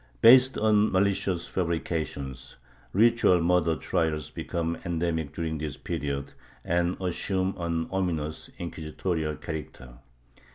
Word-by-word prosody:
Based 130 Hz, +2 st, +7 dB
on 110 Hz, 0 st, +3 dB
malicious 95 Hz, -2 st, +1 dB
fabrications, 80 Hz, -6 st, -3 dB, 0.4 s
ritual 115 Hz, -3 st, +4 dB
murder 85 Hz, -1 st, +2 dB
trials 75 Hz, +2 st, -1 dB
become 85 Hz, -1 st, -3 dB
endemic 85 Hz, -3 st, -1 dB
during 80 Hz, 0 st, -3 dB
this 75 Hz, -1 st, -4 dB
period, 70 Hz, -1 st, -4 dB, 0.3 s
and 85 Hz, +1 st, 0 dB
assume 95 Hz, +1 st, -1 dB
an 85 Hz, -1 st, -1 dB
ominous, 85 Hz, -5 st, -2 dB
inquisitorial 80 Hz, -1 st, -3 dB
character. 65 Hz, -7 st, -8 dB
85 Hz, 100 wpm, -27 LUFS, 75-95 Hz, 0.4 s, Based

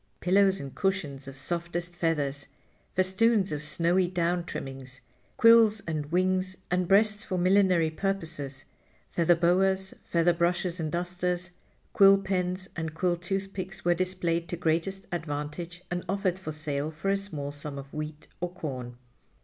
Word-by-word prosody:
Pillows 195 Hz, +1 st, +4 dB
and 135 Hz, -1 st, -7 dB
cushions 155 Hz, -9 st, -2 dB
of 135 Hz, -, -8 dB
softest 170 Hz, +4 st, -4 dB
feathers, 145 Hz, -5 st, -1 dB, 0.5 s
festoons 190 Hz, +2 st, +2 dB
of 150 Hz, -1 st, -2 dB
snowy 170 Hz, +5 st, +1 dB
down 175 Hz, 0 st, 0 dB
trimmings, 135 Hz, -5 st, -7 dB, 0.4 s
quills 230 Hz, -2 st, +7 dB
and 155 Hz, -4 st, -3 dB
wings 185 Hz, +1 st, +1 dB
and 180 Hz, 0 st, +1 dB
breasts 210 Hz, +2 st, +3 dB
for 185 Hz, -4 st, -3 dB
millinery 180 Hz, -3 st, +4 dB
purposes, 155 Hz, -7 st, -3 dB, 0.4 s
feather 170 Hz, 0 st, +3 dB
boas, 190 Hz, +3 st, +2 dB
feather 170 Hz, +1 st, +2 dB
brushes 175 Hz, +1 st, 0 dB
and 155 Hz, -2 st, -2 dB
dusters, 180 Hz, +1 st, -2 dB, 0.4 s
quill 195 Hz, 0 st, +7 dB
pens 185 Hz, -1 st, -2 dB
and 160 Hz, -1 st, -4 dB
quill 175 Hz, +1 st, +1 dB
toothpicks 190 Hz, 0 st, -4 dB
were 175 Hz, -, +5 dB
displayed 170 Hz, -2 st, -1 dB
to 175 Hz, -, -3 dB
greatest 170 Hz, +4 st, -1 dB
advantage 165 Hz, +2 st, -4 dB
and 175 Hz, 0 st, -2 dB
offered 190 Hz, -2 st, 0 dB
for 170 Hz, -5 st, -5 dB
sale 150 Hz, -1 st, -2 dB
for 160 Hz, +5 st, -3 dB
a -, -, +3 dB
small 155 Hz, -8 st, -5 dB
sum 145 Hz, 0 st, -5 dB
of 140 Hz, 0 st, -9 dB
wheat 150 Hz, 0 st, -6 dB
or 180 Hz, -, -2 dB
corn. 130 Hz, -8 st, -6 dB
175 Hz, 145 wpm, -28 LUFS, 155-190 Hz, 0.5 s, quills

